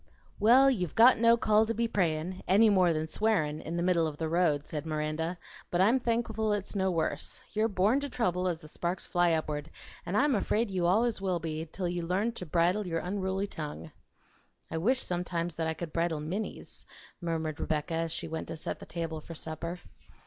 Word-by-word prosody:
"Well, 255 +6 +6
you've 180 - -2
got 240 +2 +7
no 230 0 +6
call 215 -1 +3
to 230 - -1
be 235 0 +1
prayin', 180 -2 -1
any 210 +4 +6
more 185 -3 +4
than 155 -1 -1
swearin', 160 -5 0
in 165 +2 -4
the 170 - 0
middle 175 -3 +3
of 150 -2 -6
the 160 - -2
road," 155 -3 +2
said 150 -2 -4
Miranda; 155 +2 -2 0.3
"but 175 - 0
I'm 225 +8 +5
thankful 225 -3 0
it's 205 -2 -3
no 190 -1 +1
worse. 160 -4 -2
You're 215 +1 +2
born 210 +5 +2
to 285 0 -4
trouble 185 -7 0
as 170 -3 -2
the 155 - -11
sparks 175 +3 -3
fly 175 -1 +2
upward, 155 -1 -2 0.3
an' 175 +3 -3
I'm 285 +4 +3
afraid 215 0 0
you 180 -2 +1
allers 220 +3 +2
will 185 -2 0
be 160 -1 -4
till 185 -2 -3
you 175 0 -2
learn 185 +7 0
to 185 -6 -7
bridle 175 +5 +2
your 165 -1 -1
unruly 190 +1 -2
tongue." 150 - -7 0.8
"I 160 - -1
wish 255 +9 +2
sometimes 175 -1 -2
that 165 -1 -1
I 160 - -1
could 165 -2 -6
bridle 165 -2 0
Minnie's," 180 +8 -5 0.3
murmured 160 -2 -2
Rebecca, 155 +1 -1
as 165 0 -1
she - - -3
went 160 0 -4
to - - -5
set 160 - -4
the - - -11
table 165 -2 -4
for 165 - -9
supper. 165 +3 -5
175 Hz, 205 wpm, -30 LUFS, 160-210 Hz, 0.8 s, got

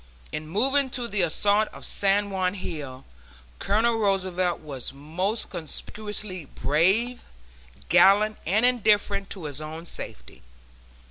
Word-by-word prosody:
In 155 0 -5
moving 265 - +2
to 240 -1 -3
the 205 -3 0
assault 200 +5 +2
of - - -9
San 200 +1 +1
Juan 185 0 0
Hill, 145 -8 -6 0.5
Colonel 225 +3 +2
Roosevelt 185 -3 0
was 140 -5 -4
most 170 - -2
conspicuously 195 +2 -4
brave, 190 - +1 0.7
gallant 200 +5 +5
and 215 +7 +3
indifferent 205 -5 +2
to 190 - -4
his 145 -1 -5
own 160 +2 -7
safety. - - -8
195 Hz, 120 wpm, -26 LUFS, 160-215 Hz, 0.7 s, gallant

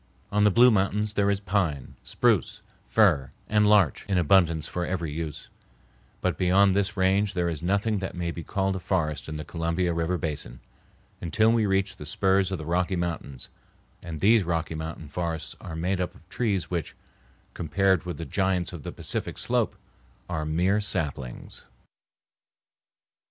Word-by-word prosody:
On 105 0 +2
the - - +7
Blue 120 +5 +6
Mountains 105 +1 +1
there 100 -1 +2
is 100 -1 +1
pine, 95 -9 -1
spruce, - - +1 0.2
fir, 90 - +3 0.2
and 105 0 +3
larch 100 -8 +4
in 100 -2 +1
abundance 85 -2 +3
for 90 - -3
every 85 -3 -2
use, 80 -1 -5 0.7
but - - -1
beyond 95 +1 +4
this 100 +1 0
range 95 +1 +2
there 90 -1 +1
is 80 -3 -3
nothing 100 +4 +1
that 95 -1 -5
may 85 -1 -2
be 85 - -6
called 95 0 -1
a - - -3
forest 80 -5 -1
in 80 - -4
the 75 - -6
Columbia 85 +2 -1
River 85 +2 0
basin, 75 -6 -3 0.6
until 110 +6 +3
we 115 -2 +2
reach 95 +1 0
the 75 - -8
spurs 95 +3 +2
of 95 - -1
the 80 - -7
Rocky 90 +3 0
Mountains; 85 -6 -4 0.5
and 80 -4 -7
these 110 +2 +5
Rocky 80 -2 -2
Mountain 80 -1 -6
forests 80 0 -3
are 80 - -7
made 90 +3 -1
up 90 - -3
of 85 - -20
trees 100 -9 -1
which, 85 -3 -3 0.6
compared 95 +4 +1
with 90 -1 -5
the 85 - -5
giants 95 +2 0
of 85 - -7
the - - -6
Pacific - - -4
Slope, - - 0 0.5
are 80 -3 -3
mere 90 +6 +2
saplings. 75 -11 -3
90 Hz, 165 wpm, -26 LUFS, 80-100 Hz, 0.7 s, the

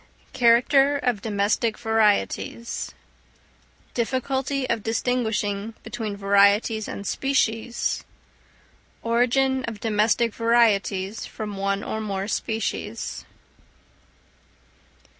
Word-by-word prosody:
_Character 270 +4 +4
of 230 -5 +1
Domestic 215 +2 0
Varieties; 220 +1 0 1.0
difficulty 265 +2 -1
of 230 -2 0
distinguishing 220 -2 -1
between 215 -2 -5
Varieties 200 +2 +3
and 200 - -6
Species; 235 +1 0 1.0
origin 255 +3 +2
of 225 -3 -6
Domestic 220 +1 +1
Varieties 220 -3 +1
from 210 -2 -6
one 200 +1 -1
or 220 - -3
more 195 -2 -3
Species. 220 0 -3
225 Hz, 80 wpm, -24 LUFS, 205-240 Hz, 1.0 s, Character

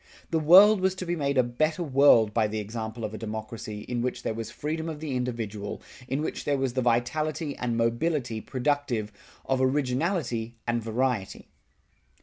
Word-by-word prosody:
The 165 - +2
world 190 +6 +7
was 190 0 +2
to 185 - -5
be 175 0 -1
made 140 -3 -1
a 130 - +6
better 155 +8 0
world 130 -7 +5
by 110 -1 +2
the 110 +1 -4
example 110 +1 -4
of 105 - -5
a 110 - -6
democracy 110 -1 -6
in 120 +2 -3
which 125 +1 -3
there - - -1
was 115 0 -5
freedom 160 +2 -4
of 155 -2 -6
the 150 -4 -3
individual, 115 -5 -3 0.3
in 135 +4 -1
which - - -4
there 145 -1 +1
was 135 -2 -1
the 130 - 0
vitality 145 +6 0
and 120 -2 -2
mobility 115 0 0
productive 130 -5 -1 0.3
of 130 -1 0
originality 130 - 0
and 120 0 0
variety. 115 -2 -2
125 Hz, 175 wpm, -27 LUFS, 115-150 Hz, 0.3 s, world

